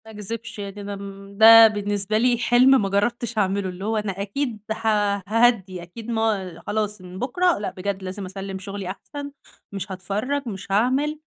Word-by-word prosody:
ما 220 - -11
أكذِبش 220 +2 -6
يعني 200 0 -6
أنا 200 0 -5
م 200 0 -10
بقى 225 0 +9
بالنسبة 205 0 -1
لي 240 +1 +3
حِلم 250 +2 +5
ما 195 - -1
جرّبتش 235 +4 -1
اعمله، 195 -1 0
اللي 185 +2 -7
هو 220 +1 0
أنا 200 -2 -3
أكيد 225 +3 -3
ه 225 +1 -3 0.4
هاهدّي، 215 -5 +2
أكيد 220 +7 -10
ما 210 -6 -1
أ - - -14
خلاص 210 -1 -1
من 180 0 -10
بُكرة 350 +8 +1
لأ 205 - -4
بجد 195 +1 -4
لازم 190 +1 -5
اسلِّم 190 +1 -6
شُغلي 195 -1 -6
أحسن، 285 +8 -7 0.4
مش 195 0 -5
هاتفرّج، 210 +10 -3
مش 195 -2 -7
هاعمل، 265 +9 +1
205 Hz, 180 wpm, -23 LUFS, 195-230 Hz, 0.4 s, بقى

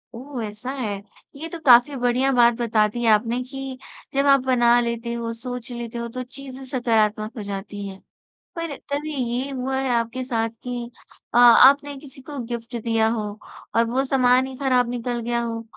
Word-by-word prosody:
ओह 255 0 -6
ऐसा 215 +4 -6
है, 215 -8 -4 0.3
ये 310 +4 -6
तो 335 - -7
काफ़ी 245 +2 +7
बढ़िया 250 +1 +1
बात 240 -1 +6
बता 220 -2 +3
दी 240 +3 -4
आपने 230 +3 +3
कि 270 0 -7 0.4
जब 275 +1 +2
आप 275 0 +6
बना 240 -2 +4
लेते 235 0 -3
हो, 235 -1 -3
सोच 245 +1 -7
लेते 235 -1 -6
हो 235 0 -3
तो 255 +2 -5
चीज़ें 265 +1 -10
सकारात्मक 225 -3 0
हो 215 - -4
जाती 200 0 -6
हैं। 195 0 -10 0.5
पर 335 -4 -4
तभी 295 +2 -3
ये 250 +1 -2
हुआ 265 0 -2
है 265 0 -1
आपके 235 +2 -1
साथ 230 -3 -1
कि 245 -1 -5 0.4
अ - - +2
आपने 270 +4 +7
किसी 270 -1 -14
को 285 +2 -9
गिफ्ट 235 0 -6
दिया 225 -1 +2
हो 225 -1 -1 0.5
और 230 0 +4
वो 260 +3 +1
सामान 255 -1 +3
ही 265 - -8
खराब 255 -3 +2
निकल 240 0 -3
गया 235 +1 -1
हो? 230 -1 -4
245 Hz, 185 wpm, -23 LUFS, 230-265 Hz, 0.5 s, काफ़ी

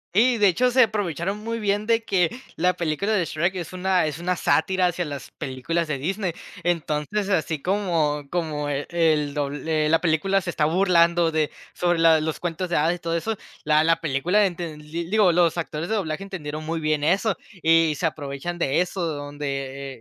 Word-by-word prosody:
Sí, 235 +3 +4
de 205 - +6
hecho, 250 +8 +2
se 255 +1 +5
aprovecharon 200 - 0
muy 230 +2 -4
bien 205 0 0
de 230 0 +2
que, 180 -6 +1 0.2
la 180 +2 +2
película 170 +4 -1
de 200 -5 +2
Shrek, 170 +4 -1
es 175 0 -6
una 185 -2 +1
es 155 - -4
una 180 +2 -1
sátira 185 +1 +2
hacia 175 0 -2
las 145 -2 -7
películas 155 +5 -3
de 145 -3 -2
Disney. 185 +4 -2 0.3
Entonces, 170 +4 -1
así 160 -5 0
como 170 -6 0
como 155 -4 -2
el 150 0 0
dobl 145 0 -3
eh, 155 -1 +2
la 160 +1 +3
película 185 +4 +2
se 180 - -5
está 155 -3 +1
burlando 170 -1 +3
de 155 -1 0 0.2
sobre 175 -1 +1
la 165 -1 +5
los 155 0 -3
cuentos 175 +1 -3
de 175 - 0
hadas 160 +4 +2
y - - -11
todo 165 -1 -2
eso. 220 +6 -2 0.3
La 155 0 +4
la 165 +1 +2
película 165 +7 +2
enten 170 -4 -6
l 150 - -16 0.2
digo, 210 -4 +5
los 170 0 +2
actores 160 0 -4
de 220 - +1
doblaje 175 -3 -2
entendieron 155 -6 -6
muy 165 +1 -2
bien 155 -1 0
eso, 195 +6 +2 0.3
y 165 -1 +4
se 165 - 0
aprovechan 145 +3 -5
de 145 -2 +1
eso, 180 +1 -3
donde, 140 -3 -4
170 Hz, 195 wpm, -24 LUFS, 155-185 Hz, 0.3 s, de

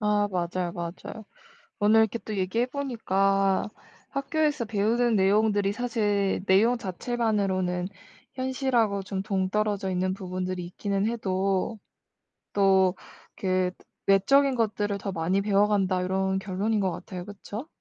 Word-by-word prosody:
아 210 -1 +2
맞아요, 180 -1 -2
맞아요. 175 +5 -7 0.5
오늘 215 +1 +5
이렇게 220 +1 +1
또 215 - -5
얘기해 190 +6 0
보니까 195 -8 +1 0.4
'학교에서 295 -1 0
배우는 225 +3 +1
내용들이 205 0 +3
사실 210 -6 0
내용 225 +6 +4
자체만으로는 190 -4 -1 0.4
현실하고 255 -6 0
좀 190 -1 -4
동떨어져 195 0 0
있는 185 +1 0
부분들이 185 -1 -4
있기는 200 +3 -2
해도 195 -1 -1 0.8
또 190 -2 +4 0.4
그 185 -1 0 0.3
외적인 270 +9 +4
것들을 210 -3 0
더 195 - -4
많이 180 +3 0
배워 205 0 +3
간다.' 190 -3 +1
요런 190 +1 0
결론인 200 +3 -1
것 190 -2 +1
같아요. 180 -1 -7
그쵸? 205 +6 -8
200 Hz, 290 characters per minute, -27 LUFS, 190-220 Hz, 0.8 s, 오늘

